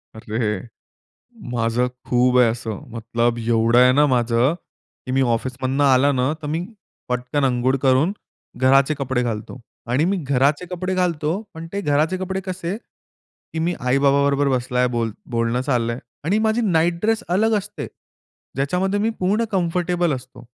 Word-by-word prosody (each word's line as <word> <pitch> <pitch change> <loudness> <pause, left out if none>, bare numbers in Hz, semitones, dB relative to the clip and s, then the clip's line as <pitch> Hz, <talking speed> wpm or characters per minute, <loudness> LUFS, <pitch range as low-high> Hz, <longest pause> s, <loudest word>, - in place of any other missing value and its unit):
अरे, 110 -1 -2 0.9
माझं 120 +1 +1 0.2
खूप 125 0 +3
आहे 125 - +6
असं. 110 -3 -5 0.2
मतलब 115 +1 0
एवढं 115 0 +2
आहे 125 0 +7
ना 145 +2 +5
माझं 120 +3 +2 0.5
की 130 - -4
मी 135 +1 +2
ऑफिसमधनं 130 +3 -1
आला 135 +1 +4
ना, 130 +1 +1
तर 150 - -5
मी 160 +4 -2 0.4
पटकन 125 +4 -1
अंघोळ 130 0 +1
करून 135 +6 +3 0.5
घराचे 135 +3 +4
कपडे 130 -3 -1
घालतो. 115 +1 -4 0.3
आणि 135 +6 +2
मी 195 +2 +1
घराचे 140 +5 +2
कपडे 185 +1 -2
घालतो. 175 0 0
पण 165 0 -8
ते 200 - -2
घराचे 155 +2 +1
कपडे 190 +1 -3
कसे, 185 0 -3
की 165 -7 -14
मी 170 +2 0
आई-बाबा 140 +2 +3
बरोबर 140 0 +2
बसलाय, 125 -1 +1
बोल 115 -2 -1 0.2
बोलणं 115 +1 0
चाललंय 120 -3 -1 0.3
आणि 190 +6 +2
माझी 220 +2 +1
नाईट 170 -4 +2
ड्रेस 225 +2 +1
अलग 215 +5 +2
असते. 205 +1 -6 0.7
ज्याच्यामध्ये 180 +9 0
मी 220 +2 +1
पूर्ण 200 +5 +1
कम्फर्टेबल 175 -2 0
असतो. 125 -1 -9
135 Hz, 150 wpm, -21 LUFS, 125-175 Hz, 0.9 s, आहे